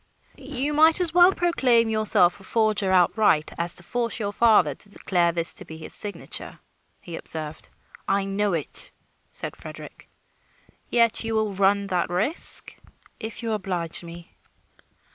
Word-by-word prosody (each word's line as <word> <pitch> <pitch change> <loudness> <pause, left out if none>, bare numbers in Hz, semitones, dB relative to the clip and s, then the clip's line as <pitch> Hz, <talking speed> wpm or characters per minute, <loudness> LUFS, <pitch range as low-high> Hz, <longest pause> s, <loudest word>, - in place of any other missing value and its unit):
"You 280 +1 -2
might 315 +3 +4
as 345 -3 -1
well 355 +1 +6
proclaim 260 -11 +1
yourself 215 -5 +2
a - - -16
forger 215 -2 0
outright, 180 -3 +2
as 170 +1 +1
to 175 - -1
force 235 +5 -3
your 205 -2 -3
father 210 -9 +3
to 205 - -6
declare 175 -4 0
this 170 0 +2
to - - -3
be 160 - -11
his 160 - -7
signature," 205 -1 -3 0.4
he 170 - -9
observed. 155 -1 -6 0.4
"I 195 0 0
know 200 0 -1
it," 160 -4 +1 0.4
said - - -7
Frederick. - - -12 0.8
"Yet 230 -1 +2
you 225 0 -3
will 215 -2 -1
run 200 +1 +1
that 180 -4 -2
risk?" 210 - +4 0.4
"If 225 +2 -6
you 225 - -3
oblige 180 -6 -3
me." 170 0 -12
205 Hz, 150 wpm, -23 LUFS, 175-230 Hz, 0.8 s, well